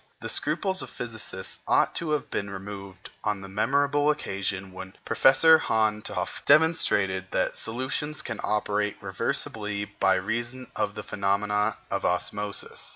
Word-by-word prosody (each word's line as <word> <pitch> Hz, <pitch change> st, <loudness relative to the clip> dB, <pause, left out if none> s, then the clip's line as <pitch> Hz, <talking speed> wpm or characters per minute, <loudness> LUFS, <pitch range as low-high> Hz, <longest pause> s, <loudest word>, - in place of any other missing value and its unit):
The -, -, -6 dB
scruples 190 Hz, -2 st, +1 dB
of -, -, -6 dB
physicists 110 Hz, -6 st, -4 dB
ought -, -, +3 dB
to 170 Hz, -, -3 dB
have 150 Hz, -1 st, -2 dB
been 100 Hz, -, -2 dB
removed 100 Hz, -1 st, -8 dB
on 105 Hz, -2 st, -1 dB
the 95 Hz, -, -8 dB
memorable 140 Hz, +8 st, +2 dB
occasion 95 Hz, -9 st, -2 dB
when 95 Hz, +1 st, -9 dB
Professor 160 Hz, +4 st, +6 dB
Van 110 Hz, -5 st, +1 dB
t'Hoff -, -, -4 dB
demonstrated 100 Hz, -, +3 dB
that -, -, 0 dB
solution 130 Hz, +6 st, -2 dB
can 110 Hz, -7 st, -3 dB
operate 105 Hz, -1 st, 0 dB
reversibly 105 Hz, -2 st, -2 dB
by 95 Hz, -1 st, +4 dB
reason 120 Hz, +6 st, -3 dB
of 105 Hz, -1 st, -1 dB
the 105 Hz, -, -5 dB
phenomena 105 Hz, +2 st, 0 dB
of -, -, -1 dB
osmosis. 105 Hz, 0 st, -2 dB
105 Hz, 140 wpm, -27 LUFS, 100-130 Hz, -, Professor